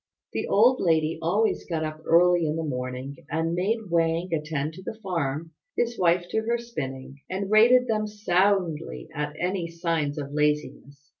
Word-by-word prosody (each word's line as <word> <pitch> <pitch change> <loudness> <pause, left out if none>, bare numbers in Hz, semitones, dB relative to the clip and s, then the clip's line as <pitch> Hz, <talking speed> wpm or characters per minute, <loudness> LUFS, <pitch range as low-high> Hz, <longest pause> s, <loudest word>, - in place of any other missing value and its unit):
The - - -2
old 245 +5 +4
lady 160 -2 +2
always 205 +7 +1
got 165 -3 -2
up 155 0 -5
early 175 0 +5
in 150 - -1
the 165 - -2
morning 130 -1 -4
and 165 +1 -1
made 200 +2 -1
Wang 165 +1 +1
attend 155 -1 -2
to 185 - -10
the 210 - -6
farm, 165 -5 -3 0.3
his 235 0 0
wife 175 -1 +3
to 220 - +1
her 235 +2 0
spinning; 135 - -6
and 195 +2 -3
rated 240 +4 +6
them 215 -2 0
soundly 180 - 0
at 150 0 -3
any 180 -1 -1
signs 165 -3 -2
of 140 -1 -5
laziness. 145 -1 -2
165 Hz, 165 wpm, -26 LUFS, 150-195 Hz, 0.3 s, rated